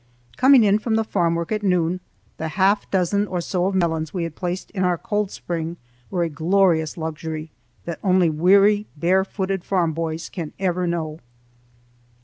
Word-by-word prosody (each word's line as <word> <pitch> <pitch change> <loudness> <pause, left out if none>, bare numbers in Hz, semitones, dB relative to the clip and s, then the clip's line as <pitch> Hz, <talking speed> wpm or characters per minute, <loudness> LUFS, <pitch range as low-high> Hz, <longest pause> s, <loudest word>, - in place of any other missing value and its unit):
Coming 260 -2 +6
in 205 0 +4
from 220 0 -1
the 225 - +2
farm 170 -6 0
work 170 +3 -3
at 215 -1 0
noon, 180 -2 +1 0.4
the 160 - -3
half 195 +5 +1
dozen 200 +2 +1
or 180 -2 -2
so 180 +1 -1
of 195 - -1
melons 160 -4 0
we 175 - -1
had 165 -2 -4
placed 180 0 -4
in 190 -3 -2
our 180 -1 +2
cold 210 -2 -1
spring 170 -2 -4 0.3
were 180 -3 0
a - - 0
glorious 165 0 +1
luxury 160 -1 -5 0.3
that 170 -2 -5
only 185 -3 +4
weary 200 +6 +4
barefooted 190 +2 0
farm 175 -5 0
boys 165 0 -3
can 165 -5 -6
ever 180 -2 0
know. 160 -2 -3
180 Hz, 170 wpm, -22 LUFS, 165-195 Hz, 0.4 s, Coming